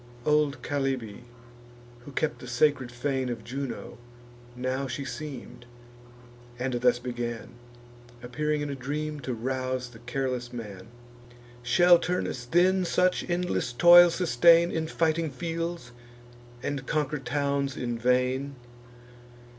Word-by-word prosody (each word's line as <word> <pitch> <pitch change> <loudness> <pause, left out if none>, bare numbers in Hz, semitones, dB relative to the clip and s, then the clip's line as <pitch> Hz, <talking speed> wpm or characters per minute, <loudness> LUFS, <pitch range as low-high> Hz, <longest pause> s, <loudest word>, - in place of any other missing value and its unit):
Old 150 -1 +2
Chalybe, 130 -6 -3 0.8
who 145 - -9
kept 150 +2 -1
the 125 - -10
sacred 130 0 +1
fane 130 +1 -2
Of 115 -2 -5
Juno, 125 -1 -6 0.6
now 130 +2 -2
she 130 +2 -4
seem'd, 125 -4 -8 0.9
and 125 +1 -2
thus 125 0 +3
began, 120 -1 -5 0.7
Appearing 150 +4 -1
in 145 -1 -3
a - - -4
dream, 150 +3 -4
to 130 -2 -4
rouse 130 +1 -3
the 115 -2 -14
careless 125 0 -3
man: 105 -6 -8 0.7
"Shall 175 +8 +5
Turnus 160 -8 -2
then 185 +7 +3
such 180 +1 +1
endless 175 -7 -1
toil 175 +7 +8
sustain 170 +1 +4
In 160 0 -2
fighting 160 0 0
fields, 165 0 -4 0.7
and 140 -2 -3
conquer 150 -2 -1
towns 140 0 -1
in 120 -2 -3
vain? 125 +3 +1
135 Hz, 120 wpm, -27 LUFS, 125-155 Hz, 0.9 s, toil